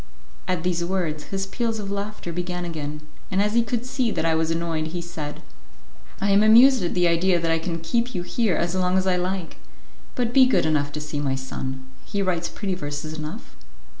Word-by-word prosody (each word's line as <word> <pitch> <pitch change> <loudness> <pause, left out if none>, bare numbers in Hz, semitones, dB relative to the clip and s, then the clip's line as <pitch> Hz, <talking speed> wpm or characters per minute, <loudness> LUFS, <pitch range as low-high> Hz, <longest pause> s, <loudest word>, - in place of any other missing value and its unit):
At 180 -3 -1
these 175 -1 0
words, 170 -4 -2
his 195 0 -3
peals 230 +2 -2
of 200 -2 -4
laughter 200 -3 -4
began 180 +1 -3
again, 150 -3 -5 0.3
and 190 - 0
as 210 +1 +2
he 235 - +5
could 235 +1 -2
see 255 -2 0
that 190 - -1
I 165 - +3
was 160 0 +1
annoyed, 165 -1 -1
he 175 +2 -4
said, 160 -4 -6 0.8
"I 200 - +1
am 200 +1 +6
amused 240 +4 +7
at 175 - -1
the 180 -1 +4
idea 170 +1 +3
that 165 -1 0
I 165 - +2
can 165 0 -3
keep 235 +9 -1
you 175 - -1
here 210 +1 +1
as 170 +1 0
long 185 0 +2
as 190 - +1
I 185 -1 +2
like. 180 -1 -3 0.6
But 240 -1 0
be 260 -1 +7
good 255 - +3
enough 145 -2 +1
to 150 - -4
see 150 -1 -4
my 135 -2 0
son; 130 0 -5 0.2
he 200 -1 -2
writes 175 -3 0
pretty 195 -3 -3
verses 150 -2 -4
enough." 155 +7 -7
180 Hz, 215 wpm, -24 LUFS, 160-200 Hz, 0.8 s, amused